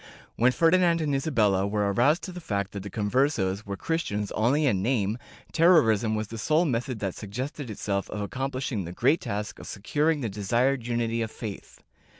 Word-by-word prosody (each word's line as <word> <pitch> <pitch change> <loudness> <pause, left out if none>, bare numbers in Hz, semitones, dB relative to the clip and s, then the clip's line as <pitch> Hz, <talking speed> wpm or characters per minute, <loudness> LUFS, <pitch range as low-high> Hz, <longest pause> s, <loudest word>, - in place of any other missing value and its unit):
When 120 +3 +4
Ferdinand 170 +3 +3
and 150 -3 -1
Isabella 110 -9 +2
were 100 -1 0
aroused 140 - +3
to 185 - -5
the 180 0 -8
fact 100 - -2
that 100 - -6
the 100 - -7
Conversos 105 -2 0
were 100 -1 -4
Christians 105 - -2
only 135 +8 +2
in 100 -9 +2
name, 110 -1 0 0.3
terrorism 120 - +4
was 110 -1 -3
the 115 - -6
sole 155 +9 +2
method 125 -2 -1
that 95 -3 -2
suggested 125 +6 -6
itself 100 -2 -3
of 105 -1 -4
accom 135 +4 -3
plishing 130 -6 -3
the 85 - -7
great 135 - +2
task 105 +1 -4
of - - -10
securing 150 +9 0
the 120 - -1
desired 120 +5 0
unity 115 -1 0
of 110 - -2
faith. 110 -3 -8
115 Hz, 185 wpm, -27 LUFS, 105-140 Hz, 0.3 s, When